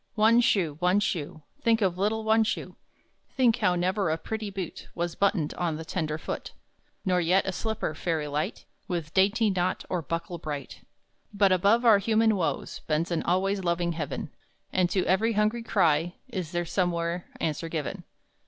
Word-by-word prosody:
One 225 +2 +5
Shoe, 170 -10 +1
One 180 +3 +3
Shoe, 155 -5 -3 0.2
Think 225 -1 +3
of 185 -3 +1
Little 215 +4 0
One 220 +1 +4
Shoe! 220 - -3 0.6
Think 245 -4 +4
how 180 - +2
never 185 +1 0
a 160 - +1
pretty 215 +5 -4
boot 190 -4 -6
Was 170 0 -2
buttoned 195 -6 +1
on 170 -3 -1
the 160 +1 -6
tender 155 -3 -2
foot; - - -5 0.5
Nor 180 -1 +2
yet 180 +3 +3
a 190 - -1
slipper, 220 -4 -2
fairy 155 -1 -2
light, 150 +1 -3 0.2
With 170 -3 -3
dainty 205 +3 +3
knot 185 -1 -1
or 180 -2 0
buckle 170 +3 -4
bright! 150 -4 -6 0.5
But 200 -2 +3
above 200 +6 +3
our 220 -3 +7
human 220 +1 +3
woes 180 -4 -2
Bends 160 +3 0
an 170 - +1
always 190 +2 0
loving 170 0 0
Heaven; 155 -4 -4 0.4
And 180 -2 +2
to 185 -1 +1
every 220 +5 +2
hungry 215 +3 +1
cry 175 -6 +2
Is 185 -9 -4
there 175 -1 -1
somewhere 170 -1 -1
answer 160 +1 -2
given. 155 -4 -4
180 Hz, 170 wpm, -27 LUFS, 165-205 Hz, 0.6 s, our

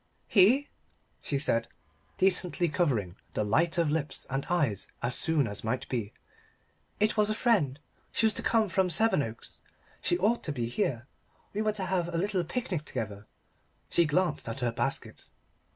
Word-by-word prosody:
"He?" 240 +9 +5 0.5
she 140 - -1
said, 115 -4 +2 0.5
decently 180 -2 +2
covering 120 - 0 0.2
the - - +1
light 160 +12 +2
of 165 -3 +2
lips 150 -3 -1
and 135 +1 -2
eyes 145 - +1 0.2
as 120 +1 0
soon 155 -1 +2
as 100 -1 -6
might 125 +4 -2
be. 115 -5 -2 0.9
"It 215 +2 +2
was 210 0 +4
a 215 - +1
friend. 185 - +2 0.3
She 225 - +2
was 220 - +4
to - - -1
come 225 -2 +2
from 190 0 +1
Sevenoaks. 145 - 0 0.4
She 175 - +2
ought 215 +6 +1
to 150 - -2
be 120 -5 -2
here. 120 0 -1 0.5
We 210 - -1
were 215 -1 +1
to 200 -3 -3
have 185 -2 0
a 170 - -2
little 190 0 0
picnic 180 - -3
together." 105 -7 -5 0.6
She 170 - +4
glanced 155 -4 0
at 125 +4 -5
her 120 -1 +1
basket. 135 +3 -3
160 Hz, 170 wpm, -29 LUFS, 125-190 Hz, 0.9 s, He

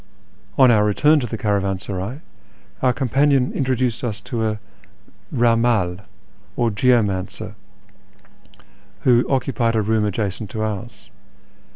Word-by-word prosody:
On 130 -2 +7
our 105 -2 +4
return 150 +9 +3
to 125 - -3
the 115 - -5
caravansaray, 100 - -2 0.6
our 130 - +3
companion 135 +1 +1
introduced 130 -3 -1
us 110 -3 -3
to 115 +2 -3
a 105 0 -3 0.7
rammdl, 115 -7 +1 0.5
or 120 -2 +1
geomancer, 105 -5 0 1.5
who 120 -1 +4
occupied 130 -3 0
a 110 - +2
room 110 +1 +1
adjacent 105 0 -3
to 110 - -3
ours. 110 +1 -6
115 Hz, 110 wpm, -21 LUFS, 105-125 Hz, 1.5 s, On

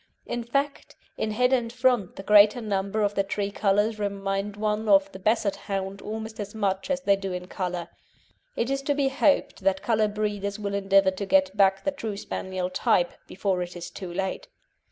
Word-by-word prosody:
In 240 - -3
fact, 275 +4 -2 0.2
in 215 - -2
head 250 +4 +2
and 235 -3 +1
front 250 -6 +1
the 195 - -8
greater 210 +3 +6
number 205 -1 -1
of 205 0 +1
the 200 - +1
tricolours 205 +2 0
remind 200 0 -2
one 215 +1 -1
of 195 -1 +5
the 190 - -9
Basset 210 0 +1
hound 195 0 -4
almost 220 +1 -6
as 205 +1 -6
much 195 -3 -1
as 275 -1 0
they 200 -7 +4
do 195 -1 -5
in 180 0 -4
colour. 180 -2 -4 0.7
It 235 +3 -1
is 275 0 0
to 285 +1 0
be 275 -1 +2
hoped 280 +2 +2
that 190 0 +1
colour 220 -2 +2
breeders 205 -1 -2
will 200 -1 -4
endeavour 195 -1 +4
to 190 +2 -5
get 190 0 +3
back 195 -1 +3
the 290 - +1
true 225 -7 -5
Spaniel 185 -2 -4
type 175 -1 +2 0.2
before 190 -1 -1
it 175 0 -5
is 175 -1 -7
too 185 -3 -7
late. 190 +2 -3
200 Hz, 195 wpm, -26 LUFS, 195-220 Hz, 0.7 s, greater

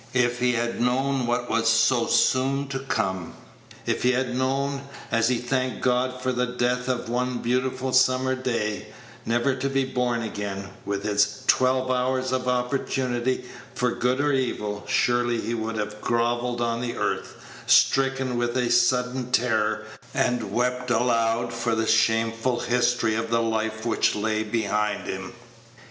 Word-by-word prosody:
If 120 -1 +2
he 125 0 +2
had 120 0 -1
known 130 +1 +1
what 120 +1 0
was 115 0 +2
so 115 +2 +3
soon 135 +2 +2
to 135 -1 -3
come; 95 -9 -2 0.5
if - - -1
he 125 +1 +3
had 125 -1 -1
known, 135 +2 0 0.3
as 115 +1 +3
he 125 - +2
thanked 130 +1 -2
God 125 0 +1
for 130 - +1
the 125 0 0
death 125 +1 -1
of 125 -3 -2
one 125 +1 -1
beautiful 130 +2 -1
summer's 130 0 +3
day, 105 -4 -2 0.4
never 120 +4 +2
to 135 +1 -2
be 135 0 +1
born 125 -2 -1
again, 100 -2 -5 0.2
with 100 0 -2
its 105 0 +1
twelve 130 0 +3
hours 130 0 0
of 130 0 -1
opportunity 125 0 -1 0.3
for 125 0 +1
good 125 +3 0
or 145 0 +2
evil, 105 -6 -2
surely 120 -1 +1
he 115 +2 -3
would 115 0 -3
have 105 0 -4
grovelled 120 +1 0
on 115 0 -1
the 120 -1 -3
earth, - - -2 0.3
stricken 135 -2 +3
with 120 +1 -1
a 125 -2 +1
sudden 125 +1 +2
terror, 110 -3 +1 0.3
and 125 -4 0
wept 125 +1 -1
aloud 120 -1 +1
for 115 -1 -1
the 110 0 0
shameful 115 +2 +2
history 125 -2 +1
of 115 +1 -2
the 115 0 +2
life 110 0 -2
which 115 - +2
lay 110 +1 0
behind 105 -1 -1
him. - - -5
120 Hz, 155 wpm, -25 LUFS, 115-130 Hz, 0.5 s, so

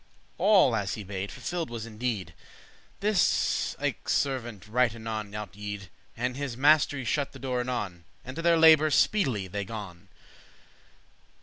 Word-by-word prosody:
All, 195 - +5
as 100 -3 -1
he 105 - -7
bade, 100 0 -5
fulfilled 160 +7 -4
was 115 -2 -5
in 110 -2 -12
deed. 105 -9 -2 0.7
This 205 -2 +2
ilke - - -3
servant 120 -8 -1
right 120 +1 +2
anon 110 -2 -5
out 105 -2 -6
yede,* 105 0 -5 0.4
*went 120 - -1
And 125 +1 -2
his 140 -4 -4
master 145 +1 +4
y 135 - -4
shut 140 +4 -1
the - - -10
door 130 -2 -2
anon, 105 -9 -3 0.2
And 130 +1 -7
to 165 - -3
their 170 0 +4
labour 160 -1 +7
speedily 135 - +2
they 100 +2 -3
gon. 95 -5 -8
120 Hz, 165 wpm, -28 LUFS, 105-140 Hz, 0.7 s, labour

